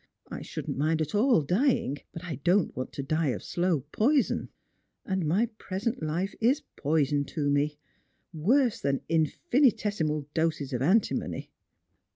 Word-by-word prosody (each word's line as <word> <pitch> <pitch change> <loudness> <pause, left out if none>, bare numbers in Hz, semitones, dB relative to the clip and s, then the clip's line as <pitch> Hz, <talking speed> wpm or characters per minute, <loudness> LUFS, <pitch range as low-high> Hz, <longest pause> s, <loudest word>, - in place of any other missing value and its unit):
I - - -5
shouldn't - - -5 0.2
at 155 -1 -2
all 235 +5 +4
mind 150 -4 -1
dying, 200 - +2
but 165 - -8
I 165 -6 -5
don't 180 +1 +2
want 130 - -4
to 140 - -4
die 155 +3 0
of 130 - -2
slow 175 -4 0
poison; 275 +5 +2 0.6
and 190 -4 -1
my 190 +9 +3
present 210 +5 -3
life 170 +6 -2
is 265 +7 +3
poison 145 -1 +1
to 145 -1 -1
me 145 +1 +1 0.3
— - - -44 0.2
worse 230 - +2
than 140 -1 0
infinitesimal 165 - +1
doses 160 -4 -1
of 125 - -1
antimony." 190 +11 +1
165 Hz, 150 wpm, -28 LUFS, 150-210 Hz, 0.6 s, all